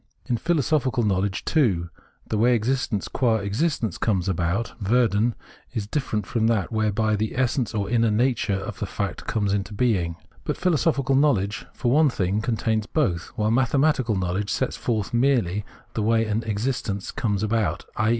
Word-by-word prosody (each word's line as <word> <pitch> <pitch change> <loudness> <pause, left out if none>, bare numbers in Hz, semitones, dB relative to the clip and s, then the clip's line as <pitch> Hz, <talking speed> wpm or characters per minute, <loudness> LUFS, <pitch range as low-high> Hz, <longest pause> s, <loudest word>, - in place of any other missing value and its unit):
In 120 - 0
philosophical 140 -4 +1
knowledge, 100 -1 0
too, 95 - +1 0.4
the 110 - -1
way 120 +2 +4
existence, 120 -3 -1
qua 120 -4 +1
existence, 110 - -1
comes 95 -5 0
about 95 +5 -1
(Werden) 115 +1 +2 0.4
is 110 -3 -1
different 110 -4 -2
from 115 +1 0
that 110 -4 +1
whereby 110 0 +1
the 110 +3 -2
essence 125 -3 0
or 100 -2 -1
inner 115 0 +2
nature 115 -2 +1
of 95 - -6
the - - -2
fact - - -4
comes 105 -3 0
into 100 +1 -2
being. 95 -8 +1 0.3
But - - -2
philosophical 150 -6 +1
knowledge, 110 -8 +1
for 120 - -1
one 150 +2 +5
thing, 100 -2 0
contains 110 -2 0
both, 90 - 0
while 110 -2 +1
mathematical 130 -1 +2
knowledge 95 +2 -1
sets 130 - -1
forth 110 -4 -2
merely 120 -6 +2 0.3
the 110 - -1
way 115 +1 +2
an 110 +1 0
existence 105 -2 -2
comes 105 -4 -1
about, 110 0 0
i. 110 -2 +1
110 Hz, 160 wpm, -24 LUFS, 100-125 Hz, 0.4 s, one